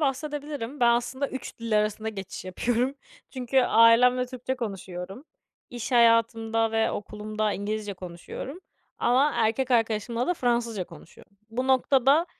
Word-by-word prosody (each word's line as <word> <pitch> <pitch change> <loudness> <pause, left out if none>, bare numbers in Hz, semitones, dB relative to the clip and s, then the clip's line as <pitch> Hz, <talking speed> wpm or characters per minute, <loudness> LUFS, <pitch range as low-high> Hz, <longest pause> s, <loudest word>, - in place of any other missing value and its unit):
bahsedebilirim. 290 -2 -3
Ben, 240 -1 +6
aslında 245 +4 0
3 260 -1 -7
dil 230 -2 +1
arasında 215 +1 -1
geçiş 195 -4 -7
yapıyorum. 240 +8 -1 0.4
Çünkü 260 0 +1
ailemle 245 +2 +5
Türkçe 255 +1 -4
konuşuyorum. 195 0 -6 0.5
İş 245 +1 -5
hayatımda 225 -1 +3
ve 225 0 +2
okulumda 215 +1 -3
İngilizce 205 0 -3
konuşuyorum 180 - -8 0.4
ama 265 +5 +3
erkek 230 +4 +1
arkadaşımla 230 0 +1
da 360 - +1
Fransızca 235 - 0
konuşuyorum. 200 +3 -16
Bu 255 +3 -2
noktada, 270 +4 +4
235 Hz, 125 wpm, -26 LUFS, 215-260 Hz, 0.5 s, Ben